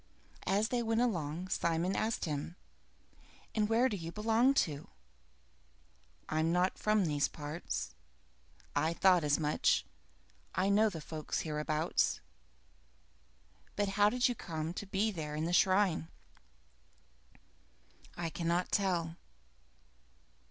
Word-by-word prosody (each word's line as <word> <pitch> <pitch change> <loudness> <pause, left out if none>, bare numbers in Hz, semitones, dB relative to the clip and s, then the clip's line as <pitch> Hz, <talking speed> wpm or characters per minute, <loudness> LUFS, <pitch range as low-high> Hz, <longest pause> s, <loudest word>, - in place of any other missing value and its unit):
As 205 +3 +2
they 245 -1 0
went 225 0 +1
along, 180 -6 -1
Simon 170 +2 0
asked 220 +1 -1
him, 150 +2 -4 1.0
"And 215 -1 +1
where 235 +3 +4
do 215 - -2
you 165 -3 -6
belong 225 +6 +3
to?" 150 -3 -7 1.4
"I'm 160 +1 +1
not 180 +2 +1
from 215 -2 +2
these 145 -3 +1
parts." 150 - -5 0.8
"I 160 +1 +2
thought 180 -2 +5
as 145 -1 +3
much. 150 -1 +2 0.7
I 185 +2 +2
know 215 +2 +4
the 165 -6 -7
folks 155 -1 -3
hereabouts. 155 +1 0 1.6
But, 205 -1 0
how 205 +1 +4
did 250 +3 +2
you 245 - 0
come 160 -6 -4
to 205 - -6
be 205 +3 +1
there 155 -5 -5
by 155 - -1
the 175 - -1
shrine?" 185 -3 +3 2.1
"I 170 -1 -3
cannot 170 +2 -1
tell." 175 -4 0
175 Hz, 120 wpm, -33 LUFS, 160-210 Hz, 2.1 s, thought